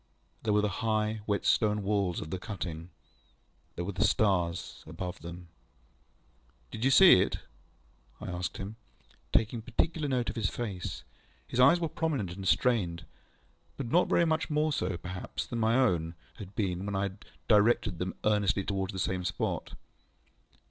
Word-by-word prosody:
There 110 - 0
were 105 0 +3
the - - +3
high, 110 -1 0
wet 100 -2 0
stone 105 -2 +2
walls 100 -3 0
of 80 - -7
the 95 - -3
cutting. 90 -5 -6 0.9
There 85 - -3
were 100 - -2
the 95 +2 0
stars 90 -6 +1
above 90 +3 -5
them. 85 +1 -9 1.2
ŌĆ£Do 110 - -4
you - - +5
see 135 - +8
it? 100 - 0 0.8
ŌĆØ - - -7
I - - -4
asked 90 0 -3
him, 100 +3 -6 0.5
taking 115 +1 +1
particular 150 +6 -1
note 125 -3 0
of - - -12
his 105 -4 +1
face. 100 -7 -5 0.4
His 120 - -3
eyes 140 +7 +7
were 165 - 0
prominent 145 - -2
and 95 +1 -6
strained, 90 -10 +1 0.7
but 135 -4 -4
not 175 - +4
very 170 - +4
much 160 0 0
more 150 0 +1
so, 90 -6 -1
perhaps, 90 +1 -5
than 120 - -4
my 110 +1 +3
own 85 -10 +2 0.2
had 100 -1 -10
been 95 -2 -1
when 100 - -2
I 95 - +1
had 100 +1 -5 0.2
directed 105 -5 +3
them 90 +1 -3
earnestly 105 -2 +2
towards 95 0 -2
the - - -5
same 95 -1 -1
spot. 90 -1 -3
100 Hz, 170 wpm, -30 LUFS, 90-115 Hz, 1.2 s, see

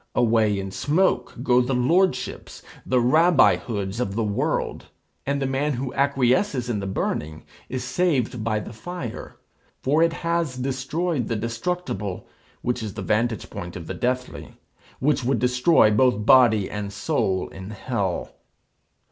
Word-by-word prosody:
Away 110 -3 +3
in 95 0 -5
smoke 145 - +1
go 125 -1 +4
the 125 +1 -1
lordships, 130 +1 0 0.2
the 130 - +3
Rabbi 155 +6 +5
hoods 100 -2 -4
of 100 -5 -2
the 115 - 0
world, 105 -1 -2 0.4
and 140 0 0
the 135 - -1
man 135 +3 0
who 130 +1 -4
acquiesces 130 0 +1
in 105 - -1
the 100 - -4
burning 80 -4 -3 0.3
is 130 -1 -3
saved 130 -5 0
by 110 -1 0
the 110 - -9
fire; 125 +1 -7 0.5
for 145 +4 +3
it 165 0 +4
has 170 -5 0
destroyed 135 +3 -2
the 115 - -1
destructible, 115 - -3 0.4
which 125 0 -1
is 105 -3 -5
the - - -5
vantage 110 -3 -1
point 85 0 -7
of 85 - -7
the - - -5
deathly, 125 +1 -3 0.4
which 145 0 +1
would 130 +1 +1
destroy 125 0 +4
both 105 -1 +2
body 115 -6 +6
and 105 -1 -5
soul 95 -2 -1
in 95 +1 -9
hell. 105 -4 -3
125 Hz, 150 wpm, -24 LUFS, 105-135 Hz, 0.5 s, body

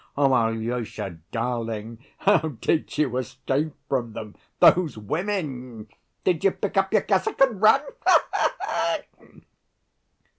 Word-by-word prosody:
Alyosha, 115 - 0
darling, 115 -1 -3
how 200 -2 +4 0.2
did 160 - -1
you 135 -5 +1
escape 140 +3 -2
from 120 -4 -2
them, 105 -1 -8 0.2
those 170 -8 +5
women? 130 - -4 0.3
Did 175 -4 +1
you 195 - +6
pick 195 +1 -4
up 195 0 +2
your - - +3
cassock 440 - 0
and 255 -8 +3
run? 220 +6 +6 0.3
Ha - - +6
ha - - +1
ha!" - - 0
130 Hz, 120 wpm, -24 LUFS, 115-180 Hz, 0.3 s, you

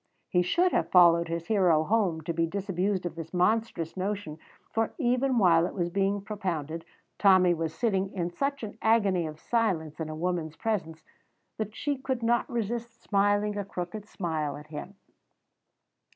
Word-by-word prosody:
He 180 - +3
should 345 - +2
have - - 0
followed 170 -2 +6
his 165 0 -3
hero 180 -6 +3
home 190 -4 +1
to 165 +2 -3
be 165 0 +1
disabused 190 0 -1
of 175 - -3
this 165 +1 -8
monstrous 180 -3 +1
notion, 190 -5 -3 0.3
for 225 0 0
even 255 -1 +1
while 175 -5 +5
it - - -8
was 175 -3 -1
being 195 +2 +1
propounded 165 -7 -4 0.3
Tommy 185 -3 +6
was 165 -1 -2
sitting 195 -3 0
in 175 -2 -3
such 275 +6 -2
an 215 0 -7
agony 200 -7 +3
of 155 0 -8
silence 175 -11 -1
in 160 -1 -3
a 155 - -5
woman's 165 -1 -2
presence 165 -8 -3 0.6
that 215 0 -3
she 290 -2 -1
could 260 -3 -3
not 235 +3 +2
resist 235 0 -3
smiling 205 +1 +2
a - - -1
crooked 195 +2 -6
smile 160 -8 -3
at 150 - -11
him. 175 +6 -7
190 Hz, 165 wpm, -28 LUFS, 165-220 Hz, 0.6 s, followed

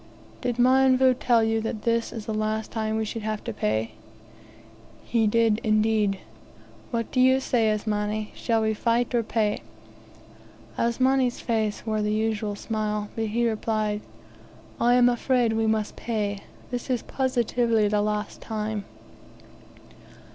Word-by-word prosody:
"Did 245 -1 -1
Mionvu 260 +1 +5
tell 235 -2 +3
you 225 0 +1
that 220 -1 -4
this 230 0 0
is 225 -3 -7
the 220 - -3
last 215 0 -2
time 220 -1 -2
we - - 0
would 225 - -5
have 215 0 -3
to 235 - -4
pay?" 110 - -1 1.1
"He 225 -2 +2
did, 225 0 +3
indeed." 215 -2 +2 0.7
"What 230 -2 -3
do 255 - 0
you 260 +1 +5
say, 235 -4 +1
Asmani? 210 0 -1
Shall 225 -2 0
we 220 0 +1
fight 235 +3 0
or 240 - +3
pay?" 215 -2 -1 1.1
Asmani's 255 +1 +1
face 220 -3 -1
wore 215 -1 0
the 210 0 0
usual 215 -1 -1
smile, 210 -1 -3
but 225 - -1
he 235 +3 +1
replied, 215 -1 -1 0.8
"I 240 +1 +4
am 245 -1 +6
afraid 245 -1 +2
we 225 0 +1
must 220 -1 0
pay. 205 -3 -3 0.3
This 245 +1 -4
is 250 -3 0
positively 240 -4 +1
the 210 0 +1
last 210 0 -2
time." 215 -2 -3
220 Hz, 145 wpm, -25 LUFS, 215-235 Hz, 1.1 s, am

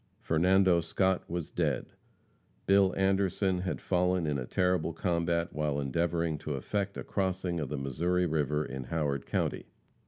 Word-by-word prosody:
Fernando 90 +2 +3
Scott 95 +3 0
was 85 -2 -4
dead. - - -1 0.7
Bill 100 -1 +5
Anderson 95 -1 +1
had 90 +1 -3
fallen 90 -1 +1
in 75 -2 0
a 60 - -5
terrible 90 -3 +1
combat 85 -1 0
while 75 -2 -1
endeavoring 85 +3 0
to 75 -1 -4
effect 100 +8 -2
a - - -4
crossing 95 -3 -1
of 75 -4 -3
the 75 - -3
Missouri 85 +7 0
river 75 -2 0
in 65 -2 -6
Howard 70 -1 -2
county. - - -1
85 Hz, 150 wpm, -30 LUFS, 75-95 Hz, 0.7 s, Bill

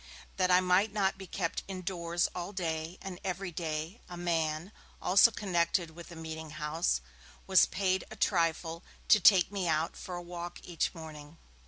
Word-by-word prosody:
That 185 -1 +2
I 180 0 +6
might 185 +3 +3
not 195 -2 0
be 190 - -8
kept 170 -1 -2
indoors 175 -2 -1
all 180 +3 -5
day 165 -1 -3
and 185 -2 -6
everyday, 175 -1 -3
a 175 - -7
man, 165 0 -1 0.3
also 190 +5 +6
connected 175 -5 0
with 170 +1 -11
the 170 - -10
meeting 160 -1 -6
house, 150 - -1 0.4
was 190 -1 +6
paid 190 -1 0
a 220 - -9
trifle 165 -3 0 0.3
to 210 - +8
take 190 0 +6
me 195 -3 -2
out 160 0 0
for 180 - -7
a 175 - -4
walk 175 0 -7
each 175 +1 -2
morning. 155 -1 -10
175 Hz, 165 wpm, -31 LUFS, 160-190 Hz, 0.4 s, to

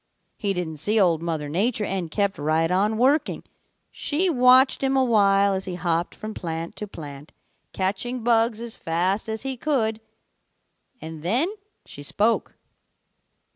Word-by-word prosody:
He 200 -2 -1
didn't 165 -3 -4
see 210 +9 +1
Old 170 -5 +3
Mother 160 -3 -3
Nature 210 +8 0
and 190 -4 -3
kept 200 +1 -1
right 160 +3 +1
on 205 +4 +1
working. 270 +6 +2 0.5
She 345 +5 0
watched 255 -1 +5
him 270 0 +1
a 265 - +4
while 200 -4 +4
as 190 0 -2
he 185 - -4
hopped 175 -1 -1
from 215 0 -7
plant 165 -2 -5
to 210 - -5
plant 145 -5 -10 0.4
catching 205 +6 -2
bugs 230 -1 +2
as 235 -1 -5
fast 185 +6 -1
as 220 +1 -3
he 270 -1 -2
could, 230 -5 -1 1.0
and 160 -3 -8
then 250 - +1 0.3
she 145 - -11
spoke. 210 +10 0
200 Hz, 150 wpm, -24 LUFS, 170-235 Hz, 1.0 s, watched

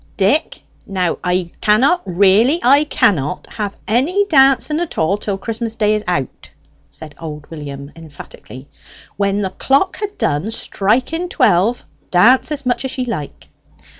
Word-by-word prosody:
"Dick! 210 - +1 0.2
Now 185 -3 -1
I 180 -1 -1
cannot 260 +12 +3
really, 200 - +3
I 280 +4 +5
cannot 180 - 0
have 205 -3 -4
any 295 - +1
dancing 275 -1 +3
at 345 -2 -5
all 160 +5 +1
till 205 -1 -4
Christmas 225 +2 -4
day 210 -1 +1
is 215 0 -1
out," 140 -8 -3 0.4
said 155 -2 -11
old 150 -2 -8
William 140 -2 -8
emphatically. 145 -4 -12 0.5
"When 200 0 0
the 190 -2 -2
clock 275 - +1
ha' 415 -1 -3
done 145 +9 -1
striking 250 - -1
twelve, 230 - +2 0.2
dance 240 - +4
as 285 -2 -3
much 245 0 0
as 265 0 -5
ye 255 - -1
like." 185 - -6
210 Hz, 145 wpm, -17 LUFS, 180-265 Hz, 0.5 s, I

